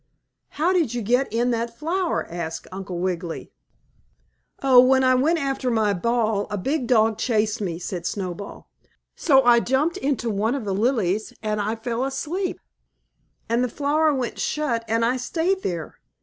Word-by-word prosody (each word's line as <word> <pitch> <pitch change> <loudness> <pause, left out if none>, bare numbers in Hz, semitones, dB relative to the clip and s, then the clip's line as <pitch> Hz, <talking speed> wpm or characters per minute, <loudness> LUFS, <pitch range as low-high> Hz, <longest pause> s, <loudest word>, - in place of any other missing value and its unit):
"How 335 +5 +2
did 315 -10 +1
you 240 - -2
get 245 +5 +1
in 240 +2 +1
that 235 0 -2
flower?" 345 +3 -1
asked 165 -1 -5
Uncle 185 -1 -6
Wiggily. 175 -2 -3 1.1
"Oh, 260 -2 +7
when 260 +1 +5
I 255 0 +5
went 295 +7 +3
after 270 -3 -1
my 220 -3 +2
ball 220 +1 0
a 205 - -3
big 265 +6 -1
dog 225 -3 +3
chased 220 -2 0
me," 175 -5 -2
said 180 0 -4
Snowball, 195 0 -5 0.5
"so 270 -4 +4
I 240 -1 +6
jumped 270 +8 0
into 260 -4 -1
one 215 +5 0
of 260 -6 -4
the 195 - -1
lilies 215 -2 0
and 215 -1 -1
I 215 +2 -1
fell 230 +2 -3
asleep, 315 +8 -3 0.9
and 235 +2 +1
the 250 - 0
flower 300 +5 +1
went 260 -4 -3
shut 265 -7 -1
and 225 +1 +1
I 250 +2 +1
stayed 340 +9 -1
there. 170 - -4
235 Hz, 165 wpm, -23 LUFS, 210-270 Hz, 1.1 s, Oh